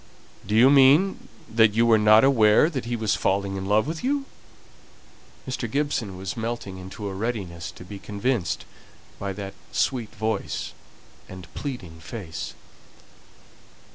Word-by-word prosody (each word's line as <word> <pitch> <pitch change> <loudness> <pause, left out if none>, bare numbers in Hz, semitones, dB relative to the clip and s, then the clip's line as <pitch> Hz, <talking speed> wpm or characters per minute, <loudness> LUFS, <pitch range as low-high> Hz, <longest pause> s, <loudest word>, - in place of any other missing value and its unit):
"Do 105 - 0
you 125 +5 +7
mean 145 +8 +5 0.2
that 110 -1 +3
you 115 +1 +4
were 115 -2 +5
not 110 +2 +6
aware 130 +2 +5
that 130 -6 -4
he 120 0 -2
was 110 -2 0
falling 100 0 0
in 95 0 -4
love 105 +2 +3
with 160 - -5
you?" 275 +1 0 1.2
Mr. 125 -3 -3
Gibson 130 -8 -1
was 95 0 -5
melting 115 -4 -4
into 95 +3 -7
a 100 - -4
readiness 95 -6 -4
to 90 - -12
be 100 +2 -8
convinced 105 -1 -2 0.5
by 100 0 -3
that 100 0 -6 0.2
sweet 120 -4 0
voice 110 +1 -3 0.6
and 95 -2 -11
pleading 100 - -6
face. 85 -2 -7
110 Hz, 140 wpm, -25 LUFS, 95-125 Hz, 1.2 s, you